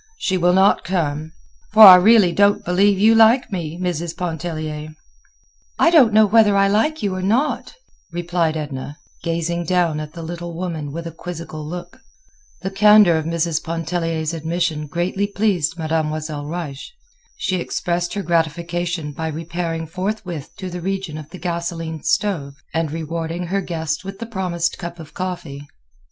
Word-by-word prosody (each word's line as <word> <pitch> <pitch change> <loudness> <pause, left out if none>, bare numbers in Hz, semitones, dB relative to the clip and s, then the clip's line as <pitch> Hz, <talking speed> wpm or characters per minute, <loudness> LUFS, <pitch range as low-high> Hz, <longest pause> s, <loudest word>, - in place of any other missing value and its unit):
She 190 - -1
will 180 0 +3
not 190 +2 +4
come.' 155 -4 -2 0.4
For 220 0 +9
I 190 -3 +13
really 200 0 +5
don't 200 +3 +3
believe 195 +3 +3
you 215 +3 +5
like 225 +2 +5
me, 170 -3 -4
Mrs. 170 -2 -3
Pontellier." 155 -3 -4 0.8
"I 335 - +4
don't 275 -10 +6
know 215 +1 +6
whether 210 -1 +4
I 195 0 +4
like 225 +10 +1
you 200 -2 0
or 185 - -3
not," 235 - 0 0.4
replied 170 -2 -1
Edna, 145 -1 -6 0.2
gazing 170 +1 -2
down 170 -3 +1
at 155 0 -7
the 170 - -8
little 170 +1 -6
woman 165 -5 -4
with 165 +3 -6
a 165 - -5
quizzical 165 -2 -7
look. 175 +6 -8 0.6
The 190 - -2
candor 210 -3 +6
of 155 - -5
Mrs. 165 -1 -1
Pontellier's 165 -1 -2
admission 165 -1 -2
greatly 180 +6 -1
pleased 190 -6 0
Mademoiselle 155 -2 -2
Reisz. 155 -4 -6 0.5
She 185 - -1
expressed 175 +1 -2
her 200 - -2
gratification 170 -1 -1
by 160 +3 -4
repairing 165 +1 -4
forthwith 185 -3 -4
to 185 -1 -6
the 180 0 -6
region 190 -4 -3
of 155 -1 -11
the 185 - -10
gasoline 170 -3 -4
stove 150 -10 -1 0.2
and 160 0 0
rewarding 165 +2 -4
her 195 +3 -1
guest 160 -2 -3
with 195 0 -7
the 230 - -6
promised 180 -6 -2
cup 170 0 -6
of 160 -2 -12
coffee. 165 -7 -5
170 Hz, 160 wpm, -20 LUFS, 160-190 Hz, 0.8 s, I